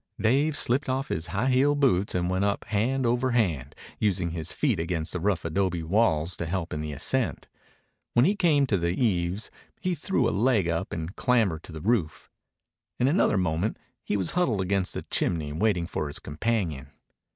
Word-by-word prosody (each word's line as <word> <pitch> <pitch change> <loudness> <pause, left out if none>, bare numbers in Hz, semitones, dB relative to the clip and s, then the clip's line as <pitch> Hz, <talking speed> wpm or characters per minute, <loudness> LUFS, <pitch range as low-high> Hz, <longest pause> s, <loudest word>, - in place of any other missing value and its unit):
Dave 140 +7 +2
slipped 130 +3 +1
off 135 +1 -1
his 80 +1 -2
high 105 +10 0
heeled 145 +3 +3
boots 100 -10 +2
and 90 -1 0
went 95 +2 0
up 100 0 0
hand 125 +5 0
over 125 +2 +1
hand, 80 - 0 0.2
using 95 -5 0
his 80 -2 -3
feet - - 0
against 80 -1 -2
the 90 - -2
rough 95 -2 0
adobe 85 0 0
walls 85 -3 +2
to 85 - -4
help 90 -1 -3
in 75 - -3
the 75 0 -4
ascent. 110 - 0 0.7
When 120 +2 +5
he 200 +5 +3
came 155 -7 +3
to 110 -7 +1
the 85 +1 -1
eaves 95 -3 0 0.3
he 185 - -1
threw 155 -5 0
a - - +1
leg 110 -4 +2
up 85 -1 -2
and 80 +3 -5
clambered 110 -11 +1
to - - -10
the 80 -1 -7
roof. 95 -6 -1 0.7
In 125 - +3
another 145 - +3
moment 90 +3 0 0.3
he 105 - -1
was 95 -3 +1
huddled 130 - +1
against 95 0 0
the - - -4
chimney 75 -4 -1
waiting 90 0 +1
for 75 -3 -3
his 70 - -5
companion. 80 - -2
95 Hz, 190 wpm, -27 LUFS, 85-120 Hz, 0.7 s, When